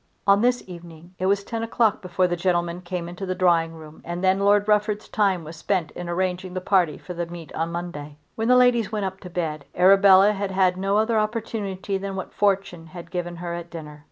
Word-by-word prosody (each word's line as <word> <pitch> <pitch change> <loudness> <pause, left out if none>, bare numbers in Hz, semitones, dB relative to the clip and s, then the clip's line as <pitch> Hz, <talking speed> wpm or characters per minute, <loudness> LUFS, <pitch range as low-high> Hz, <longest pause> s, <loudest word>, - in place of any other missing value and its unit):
On 200 +1 +5
this 245 +1 +2
evening 170 -1 -12
it 185 - 0
was 200 +1 +2
ten 230 +2 -4
o'clock 225 -2 +1
before 180 -1 0
the 175 -1 0
gentlemen 175 0 -1
came 175 -1 -5
into 175 +3 -8
the 185 -1 -2
drawing 165 -3 +2
room, 155 -1 -13
and 175 +2 -5
then 190 +1 +3
Lord 205 +1 +3
Rufford's 210 0 +1
time 195 -5 +1
was 160 +2 -9
spent 180 -1 -1
in 175 -1 -7
arranging 185 +1 -2
the - - -1
party 180 -5 +2
for 180 - -8
the 175 -1 -3
meet 170 -2 -10
on 165 +1 -2
Monday. 150 -4 -6 0.2
When 225 0 -2
the 250 +1 +6
ladies 245 -4 +3
went 210 -2 -2
up 190 0 -5
to 180 - -10
bed 160 -4 -3
Arabella 195 +1 +6
had 200 -1 -3
had 185 -1 +2
no 195 +2 0
other 220 +1 +2
opportunity 210 -3 -3
than 195 0 -5
what 190 - -6
Fortune 195 -4 0
had 170 +1 -11
given 175 -1 -4
her 170 0 -5
at 170 0 -6
dinner. 150 -3 -9
185 Hz, 220 wpm, -24 LUFS, 170-200 Hz, 0.2 s, the